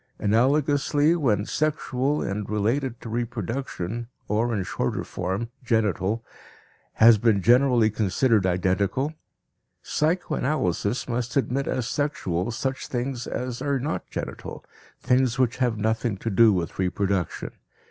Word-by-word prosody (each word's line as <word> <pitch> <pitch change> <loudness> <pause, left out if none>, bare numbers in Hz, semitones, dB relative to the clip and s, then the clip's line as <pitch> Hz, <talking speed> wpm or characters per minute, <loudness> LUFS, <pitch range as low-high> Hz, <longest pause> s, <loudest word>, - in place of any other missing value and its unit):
Analogously, 145 +7 +2
when 115 -11 +1
"sexual" 145 -1 0
and 100 +1 -3
"related 115 +4 0
to 115 - -7
reproduction" 115 -1 -3 0.2
(or, 110 +3 +1
in 105 -4 -1
shorter 65 - -2
form, 95 +6 -3
"genital") 110 -1 0 0.7
has 110 -1 +7
been 105 -4 +2
generally 120 -2 +4
considered 105 0 +2
identical, 95 - 0 0.7
psychoanalysis 150 - 0
must 120 +1 -2
admit 135 +1 0
as 125 -3 -1
"sexual" 120 - -1
such 130 +3 -3
things 125 0 -3
as 125 0 -4
are 140 0 0
not 145 +5 -3
"genital," - - -6 0.3
things 125 -1 +2
which 130 -2 +1
have 125 -4 +1
nothing 110 0 0
to 115 +3 -3
do 110 +3 +6
with 90 -3 -2
reproduction. 95 -1 -1
115 Hz, 120 wpm, -25 LUFS, 105-130 Hz, 0.7 s, has